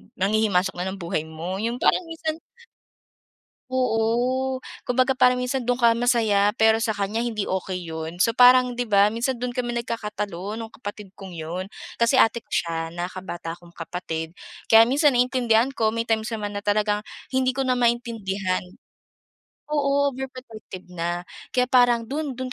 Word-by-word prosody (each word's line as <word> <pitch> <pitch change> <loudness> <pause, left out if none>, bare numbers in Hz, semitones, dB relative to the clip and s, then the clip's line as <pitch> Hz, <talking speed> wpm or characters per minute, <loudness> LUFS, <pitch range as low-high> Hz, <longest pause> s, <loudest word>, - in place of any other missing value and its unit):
nanghihimasok 195 -1 +1
na 180 - -2
ng 195 - -6
buhay 160 -2 -2
mo. 170 +4 -5
‘Yong 235 +3 -2
parang 350 - +2
minsan 320 0 -4 1.3
o. 255 +1 +1 0.3
Kumbaga, 255 +2 +2
parang 250 -1 +4
minsan 250 +1 -1
do’n 245 0 +2
ka 235 -2 +5
masay, 235 -2 +2 0.3
pero 220 0 +4
sa 220 -2 0
kanya 205 +3 -1
hindi 225 -4 -2
okey 185 -1 -3
‘yon. 160 +1 -6
So, 230 +5 +3
parang, 250 0 +6
‘di 245 -1 -3
ba, 200 +1 +5
minsan 245 +2 -1
do’n 245 0 -3
kami 240 -1 -2
nagkakatalo 210 -3 -4
no'ng 225 -1 -7
kapatid 205 -3 -7
kong 190 -3 -10
‘yon. 170 +4 -4 0.3
Kasi 235 +3 +3
ate 235 -1 +4
ko - - -43
siya, 165 -1 -1
nakakabata 175 -1 -5
akong 175 0 -16
kapatid. 165 -1 -5 0.4
Kaya 225 +1 +8
minsan 290 0 +4
naiintindihan 245 -1 +2
ko, 220 -3 +2
may 230 0 -2
times 225 +1 0
naman 205 -2 -4
na 205 - -6
talagang 210 0 +1 0.3
hindi 260 -1 +1
ko 270 - -2
na 255 - +2
maintindihan. 225 -6 0 1.0
Oo, 285 -1 +1
overprotective 250 -7 -9
na. 175 +1 -3 0.2
Kaya 250 0 +2
parang 245 -2 +4
do’n, 280 +1 -4
do’n 255 -1 -4
225 Hz, 160 wpm, -24 LUFS, 190-250 Hz, 1.3 s, Kaya